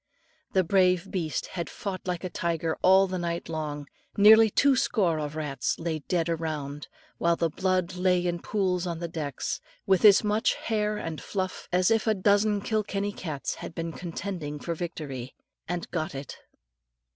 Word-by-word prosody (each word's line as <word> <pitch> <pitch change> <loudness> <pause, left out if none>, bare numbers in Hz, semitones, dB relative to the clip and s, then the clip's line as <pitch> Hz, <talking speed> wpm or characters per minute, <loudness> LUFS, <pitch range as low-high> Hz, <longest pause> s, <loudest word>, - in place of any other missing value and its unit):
The 190 - +4
brave 185 0 +2
beast 165 -5 -2
had 170 -2 -4
fought 190 -2 -5
like 180 -1 -2
a 185 - -3
tiger 165 -1 -1
all 190 +1 +6
the 185 -1 -3
night 170 0 -3
long, 150 -2 -4 0.3
nearly 220 +2 +8
two 280 +6 +4
score 180 -10 +1
of 150 0 -4
rats 150 -3 -2
lay 165 -1 -2
dead 165 +3 -1
around, 155 -3 -3 0.3
while 170 0 +3
the 165 -1 0
blood 185 0 0
lay 180 -1 +2
in 175 -1 -1
pools 185 -4 0
on 170 -1 -3
the 170 +1 -4
decks, 150 -5 -4 0.2
with 190 -2 +3
as 205 -1 +8
much 210 +1 +2
hair 210 -1 -1
and 165 -5 -5
fluff, 185 -2 -4
as 180 +3 +3
if 225 0 +2
a 220 - +3
dozen 205 +1 +3
Kilkenny 205 -1 -1
cats 155 -8 -4
had 165 - -7
been 165 0 -3
contending 170 -3 -5
for 170 - -3
victory 145 -7 -6 0.3
and 175 0 -3
got 155 -4 -2
it. 135 0 -6
175 Hz, 170 wpm, -27 LUFS, 160-195 Hz, 0.3 s, nearly